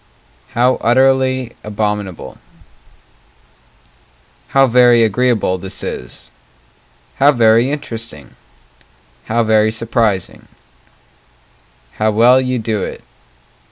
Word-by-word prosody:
How 125 +2 +2
utterly 130 0 +1
abominable 105 -3 -4 2.1
How 135 0 +3
very 120 -1 +4
agreeable 110 -4 0
this 95 +1 -7
is! 60 - -8 0.9
How 140 +2 +5
very 115 -1 +3
interesting 115 - -8 0.9
How 115 +1 0
very 110 -1 +2
surprising 110 -4 -2 1.5
How 110 0 +2
well 120 +4 +4
you 130 -1 -2
do 110 -3 -3
it! - - -6
115 Hz, 85 wpm, -16 LUFS, 105-125 Hz, 2.1 s, How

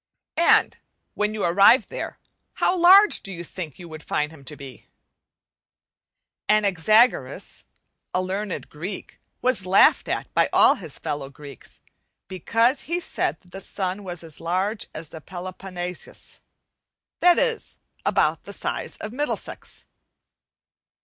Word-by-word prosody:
And 340 - +4 0.3
when 210 +1 -1
you 210 - -3
arrived 200 +8 +5
there, - - -6 0.4
how 365 - +1
large 380 +4 +7
do 195 - -7
you 175 -2 -6
think 165 -4 -7
you 175 - -10
would 155 -1 -9
find 150 0 -2
him 150 -4 -15
to 150 - -6
be? 135 -5 -12 1.6
Anaxagoras, 215 +3 +2 0.5
a - - 0
learned 190 +1 -3
Greek, 180 +6 -8 0.2
was 250 -5 +2
laughed 190 - +5
at - - -3
by - - +3
all - - +6
his 165 -8 -7
fellow 140 -2 -4
Greeks 140 0 -12 0.4
because 230 - +1
he 345 +1 0
said - - -2
that 180 - -24
the 195 - -7
sun 190 +1 -3
was 175 -3 -5
as 160 -2 -6
large 190 +6 -1
as 155 0 -8
the 160 - -10
Peloponne 180 +1 -6
sus, - - -8 0.8
that 355 0 +5
is 465 -2 0 0.3
about - - +1
the - - -7
size - - -3
of 215 +1 -7
Middlesex. 290 +3 -4
185 Hz, 135 wpm, -24 LUFS, 165-215 Hz, 1.6 s, large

